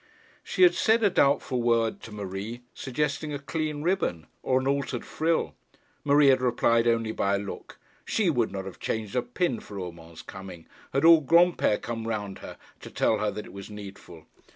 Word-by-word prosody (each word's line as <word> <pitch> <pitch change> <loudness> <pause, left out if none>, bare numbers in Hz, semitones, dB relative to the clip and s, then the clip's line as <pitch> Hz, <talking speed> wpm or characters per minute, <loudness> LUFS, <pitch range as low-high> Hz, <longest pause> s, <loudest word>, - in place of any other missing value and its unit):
She - - +1
had 355 - +7
said 225 +1 +2
a 205 - +4
doubtful 140 -5 +2
word 115 -1 +1
to 110 - -10
Marie, 105 +3 -6
suggesting 150 +2 -2
a - - -2
clean 150 +1 -3
ribbon, 165 - 0 0.2
or 130 0 +2
an 130 - -4
altered 140 -3 -1
frill. 165 +1 0 0.5
Marie 145 0 +5
had 130 -1 +4
replied 120 -1 +2
only 115 -1 +1
by 100 -2 0
a - - +1
look. 100 0 -8 0.3
She 215 -4 0
would 125 -9 +1
not 95 -1 -5
have 95 - -9
changed 110 -1 -3
a 125 - +3
pin 125 0 -1
for 100 - -10
Urmand's 85 -2 -9
coming, 95 -4 -10 0.3
had 135 +3 +1
all 165 -1 +8
Granpere 170 -7 +3
come 115 -1 -5
round 105 -3 -4
her - - -10 0.2
to - - -10
tell 110 - +1
her 105 0 0
that 105 - -6
it - - -13
was 100 +1 -9
needful. 100 -6 -11
120 Hz, 190 wpm, -27 LUFS, 100-145 Hz, 0.5 s, all